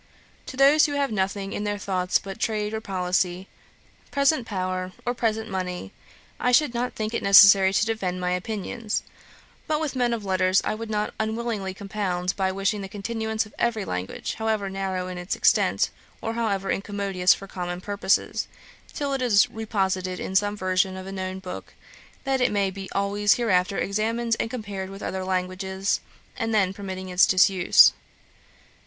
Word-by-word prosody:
To 260 - -7
those 285 +3 +6
who 290 - -4
have 280 -2 0
nothing 195 -1 -2
in 205 - -3
their 205 0 -1
thoughts 185 -2 0
but 195 +1 -8
trade 215 -2 -1
or 220 - -3
policy, 185 -1 -1 0.6
present 280 -3 +2
power, 185 -2 -3
or 245 - 0
present 220 -2 -1
money, 180 - -4 0.5
I 250 - +2
should 250 0 +4
not 245 +1 -2
think 215 +1 -3
it - - -1
necessary 195 -1 +8
to 205 +2 +2
defend 195 -5 -2
my 180 0 -1
opinions; 210 +4 -3 0.6
but 305 -1 +1
with 310 -4 -3
men 245 -2 +1
of 225 -3 -3
letters 185 0 +3
I - - 0
would 225 +1 -6
not 210 -1 -1
unwillingly 220 -3 -2
compound, 190 -3 -2
by 190 -1 0
wishing 195 +2 -1
the 195 - -6
continuance 220 +2 -2
of 210 - -16
every 225 -4 0
language, 90 +1 -4
however 215 -3 -1
narrow 190 -1 -3
in 180 -1 -6
its 180 +1 -3
extent, - - +3 0.3
or 225 - -3
however 200 -4 -1
incommodious 195 -2 +1
for 195 - -10
common 175 -2 -5
purposes, 200 0 0 0.4
till 285 -2 -2
it 270 - -1
is 220 -5 +4
reposited 190 -4 -2
in 190 - -5
some 205 +1 +2
version 185 0 0
of 185 - -7
a 195 - -7
known 185 -1 -4
book, 190 -1 -8 0.5
that 270 -2 0
it 250 - +3
may 200 -2 +1
be 195 0 -8
always 200 +1 +2
hereafter 195 -5 +1
examined 225 +3 0
and - - -1
compared 205 -6 -5
with 195 +1 -9
other 190 0 -3
languages, 190 +1 -1 0.4
and 225 -2 -1
then 190 -3 +2
permitting 190 -2 -6
its 180 0 +5
disuse. 185 -1 +6
200 Hz, 175 wpm, -25 LUFS, 185-220 Hz, 0.6 s, necessary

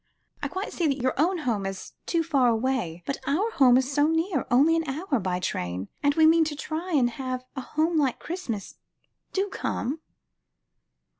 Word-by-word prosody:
I - - -1
quite 375 +2 -5
see 340 - +1
that 275 -2 +1
your 260 - +2
own 360 +4 +2
home 225 - -1
is 195 -1 -7
too 335 -1 +1
far 280 -6 +3
away, 230 -8 0
but 275 - -3
our 385 +11 +1
home 255 - +6
is 260 +1 0
so 290 +1 +4
near, 325 - 0
only 285 +7 +5
an 325 -2 -1
hour 290 -1 -1
by 180 -2 -1
train, 90 - -3
and 285 0 +2
we 320 - +5
mean 325 +1 +6
to 305 -1 -3
try 330 +4 -4
and 265 -5 +4
have 255 +1 -4
a 265 - -3
home 315 +5 0
like 270 -4 +1
Christmas. 240 - -5 0.5
Do 390 +1 0
come." 290 -4 -3
280 Hz, 190 wpm, -26 LUFS, 245-325 Hz, 0.5 s, home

